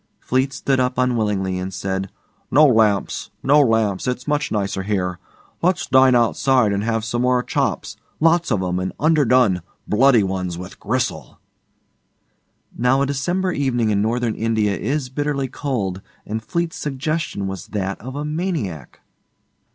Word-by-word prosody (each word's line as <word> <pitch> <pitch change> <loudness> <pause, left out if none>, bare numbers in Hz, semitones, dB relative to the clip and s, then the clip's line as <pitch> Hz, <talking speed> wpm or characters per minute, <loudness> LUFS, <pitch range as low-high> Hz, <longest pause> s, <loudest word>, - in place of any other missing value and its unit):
Fleete 130 +2 0
stood 135 0 0
up 125 0 0
unwillingly, 105 -7 0
and 95 +1 -4
said, 95 0 -3 0.4
'No 150 +4 +6
lamps 110 -7 +2
no 145 +3 +5
lamps. 110 -5 +1
It's 125 0 -3
much 150 0 0
nicer 100 -2 -1
here. 95 -3 -2 0.4
Let's 180 +1 +1
dine 130 -1 +5
outside 120 -1 +3
and 100 +1 -1
have 115 -1 -1
some 120 +1 -1
more 125 0 +2
chops - - -2 0.2
lots 165 +1 +3
of 100 -5 +1
'em 90 0 -1
and 95 0 -3
underdone 130 - +3 0.3
bloody 120 0 +4
ones 95 -2 -3
with 90 +2 -9
gristle.' 105 - -3 1.4
Now 130 +3 +2
a - - +2
December 175 +7 -1
evening 120 -8 0
in 100 -1 +1
Northern 115 +1 0
India 110 -3 0
is 135 +2 -2
bitterly 140 0 -1
cold, 110 -10 -3 0.2
and 110 +1 -3
Fleete's 170 +7 -3
suggestion 145 -6 -3
was 95 -2 -5
that 100 -2 -3
of 130 +4 -7
a 145 +1 -3
maniac. 150 - -4
120 Hz, 150 wpm, -21 LUFS, 100-135 Hz, 1.4 s, No